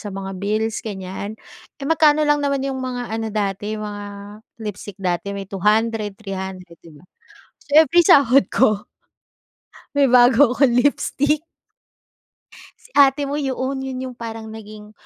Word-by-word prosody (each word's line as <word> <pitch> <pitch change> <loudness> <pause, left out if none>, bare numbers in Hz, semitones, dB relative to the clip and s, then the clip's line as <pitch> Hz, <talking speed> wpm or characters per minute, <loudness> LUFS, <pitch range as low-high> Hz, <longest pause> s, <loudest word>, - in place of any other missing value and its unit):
sa 210 - -7
mga 195 0 -5
bills, 215 +2 -1
ganiyan. 200 0 -6 0.4
Eh, - - -5
magkano 310 -1 +4
lang 295 0 +2
naman 280 -1 0
yung 270 -1 -3
mga 255 -1 -4
ano 225 0 -2
dati, 205 0 -2
mga 210 -1 -6 0.6
lipstick 205 -1 -7
dati, 180 +1 -2
may 195 - -5
200, 210 +1 0
300, 190 -4 -7
'di 165 -2 -16
ba? 145 - -18 0.6
So, - - -25 0.2
every 345 +2 +4
sahod 275 -1 +5
ko 215 -5 +2 1.1
may 285 -1 +4
bago 245 +1 +6
akong 255 0 +2
lipstick. 285 +3 +1 1.3
Si - - -22
ate 280 0 +4
mo, 285 +2 -3
yoon, 265 0 -2
'yon 260 -1 -5
yung - - -19
parang 225 -1 -7
naging 215 -1 -11
225 Hz, 145 wpm, -21 LUFS, 205-270 Hz, 1.3 s, bago